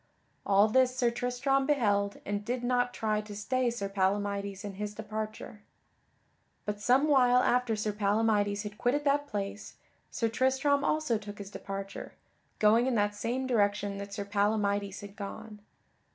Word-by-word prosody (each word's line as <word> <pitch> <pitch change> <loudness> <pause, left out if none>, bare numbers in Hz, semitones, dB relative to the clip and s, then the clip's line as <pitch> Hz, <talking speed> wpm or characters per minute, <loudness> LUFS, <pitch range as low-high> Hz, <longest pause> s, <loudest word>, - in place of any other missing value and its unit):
All 200 +1 +5
this 255 +3 +3
Sir 245 -2 +2
Tristram 250 +3 0
beheld 205 -8 +1
and 205 0 -2
did 245 +2 -3
not 245 0 +1
try 215 -2 -1
to 210 -1 -9
stay 255 +4 0
Sir 230 -4 -3
Palamydes 200 +1 -1
in 200 - -5
his 210 0 -4
departure. 215 0 -6 1.0
But 210 0 -3
some 260 +6 +4
while 250 -4 +5
after 245 -2 +2
Sir 210 0 -2
Palamydes 205 0 +1
had 210 0 -8
quitted 275 +4 +1
that 290 0 +1
place, 205 -2 -5 0.3
Sir 230 - -1
Tristram 265 +4 +2
also 305 -9 +1
took 205 -1 -9
his 200 -1 -8
departure, 195 -1 -7 0.4
going 225 +4 +4
in 260 - +1
that 205 -1 +1
same 245 +5 -2
direction 205 -4 +1
that 200 0 -7
Sir 200 0 -4
Palamydes 205 -1 0
had 200 0 -10
gone. 210 +1 -8
215 Hz, 155 wpm, -30 LUFS, 205-245 Hz, 1.0 s, All